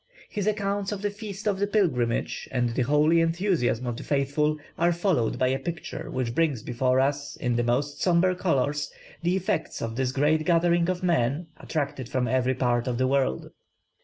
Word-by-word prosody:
His 205 -2 -3
accounts 200 -1 -1
of 205 -1 -4
the 205 - 0
feast 205 0 -7
of 195 -2 +1
the 205 - +1
pilgrimage 130 - 0
and 125 -2 +1
the 125 - -1
holy 150 +6 +4
enthusiasm 165 - +1
of 120 -1 -3
the - - -7
faithful, 145 +2 +1 0.2
are 175 - +2
followed 170 - +1
by 130 - +2
a 135 +1 0
picture 165 +4 -5
which 125 -3 -2
brings 145 -7 +1
before 125 +1 +1
us, 140 +1 0
in 120 -1 -1
the 120 - +2
most 130 +5 -1
sombre 180 +1 +3
colours, 145 -4 0 0.3
the 175 +2 +1
effects 190 +2 -1
of 115 0 -4
this 130 -1 0
great 150 +3 +2
gathering 170 +1 +3
of 185 0 -2
men, 160 -1 +1
attracted 140 -5 -3
from 130 -2 0
every 130 0 +1
part 120 -1 +1
of 120 -2 -1
the 130 - +2
world. 130 - 0
145 Hz, 190 wpm, -26 LUFS, 130-175 Hz, 0.3 s, holy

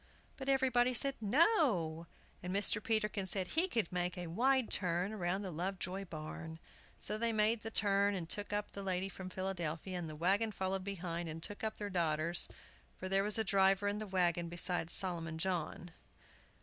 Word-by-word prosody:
But 270 0 -5
everybody 255 -2 +3
said 275 +4 +2
"No!" 215 - +3 0.3
and 180 - -4
Mr. 200 +1 +4
Peterkin 210 -3 +1
said 185 0 0
he 330 +4 +2
could 225 - -1
make 180 0 -2
a 180 - -4
wide 250 +8 +2
turn 180 +2 +1
round 190 0 -1
the 185 - -4
Lovejoy 185 +3 -3
barn. 160 0 -7 0.4
So 215 - -2
they 230 0 +1
made 220 +1 +2
the 225 - -4
turn, 200 -1 +2
and 175 -3 -4
took 205 +4 -4
up 205 0 -2
the 200 - -6
lady 190 0 -1
from 185 0 -8
Philadelphia, 185 -2 -3
and 165 -2 -5
the 155 - -7
wagon 195 +7 +1
followed 190 -1 -2
behind 175 -3 -4
and 160 +1 -7
took 205 - -4
up 220 0 -2
their 205 -1 -4
daughters, 170 -1 +2 0.5
for 185 - -5
there 195 +1 +3
was 210 +1 +3
a 220 - +2
driver 195 0 +3
in 205 +1 -1
the 215 - -4
wagon 175 -3 +1
besides 175 -1 0
Solomon 165 -4 +1
John. 175 -1 -2
190 Hz, 185 wpm, -35 LUFS, 175-210 Hz, 0.5 s, Mr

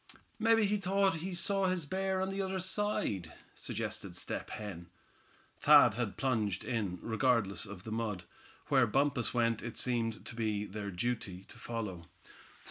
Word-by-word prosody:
"Mebbe 225 0 +4
he 210 +1 +2
thought 195 -2 +2
he 180 +3 -4
saw 195 +2 +2
his 180 -4 0
bear 190 +4 -1
on 190 0 -1
the 195 0 -2
other 190 0 -2
side," 185 - -1 0.2
suggested - - -4
Step - - -3
Hen. 95 -5 -7 0.7
Thad - - +8
had 120 -4 -3
plunged 110 -8 0
in, 105 -7 -2
regardless 110 -4 +1
of 95 -2 -9
the 110 - -7
mud. 110 -5 -2 0.5
Where 130 -4 +5
Bumpus 135 +2 +2
went 115 -2 +2
it 120 - -6
seemed 115 -3 -1
to - - -5
be 110 -3 -1
their 105 0 -5
duty 100 -2 -3
to - - -12
follow. 105 -8 -5
115 Hz, 155 wpm, -33 LUFS, -, 0.7 s, Thad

